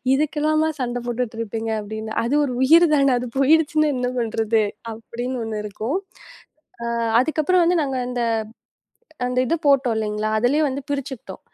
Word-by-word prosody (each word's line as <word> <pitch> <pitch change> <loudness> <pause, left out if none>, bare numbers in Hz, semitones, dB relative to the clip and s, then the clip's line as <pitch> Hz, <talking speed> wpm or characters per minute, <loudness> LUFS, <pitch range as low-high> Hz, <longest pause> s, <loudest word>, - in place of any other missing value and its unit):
இதுக்கெல்லாமா 310 +2 +1
சண்டை 245 -1 -2
போட்டுட்டு 240 -1 -3
இருப்பீங்க 225 0 -3
அப்படின்னு. 220 +1 -6
அது 255 +5 0
ஒரு 250 -3 -3
உயிர் 330 +6 +6
தானா? 275 -3 +3
அது 250 - -5
போயிடுச்சுன்னா 310 +2 +3
என்ன 250 0 -1
பண்றது? 225 -1 +1 0.3
அப்படின்னு 240 +3 -5
ஒண்ணு 215 -1 -3
இருக்கும். 220 - -3 0.9
ஆ - - -2 0.3
அதுக்கப்புறம் 315 +6 +2
வந்து 350 +1 +3
நாங்க 270 -2 -3
அந்த 250 -1 -3 1.1
அந்த 250 0 -3
இதை 295 - +1
போட்டோம் 270 -4 +4
இல்லீங்களா? 215 0 -2
அதுலயே 245 +7 +2
வந்து 275 +1 -3
பிரிச்சுக்கிட்டோம். 270 -8 -5
250 Hz, 145 wpm, -22 LUFS, 225-290 Hz, 1.1 s, உயிர்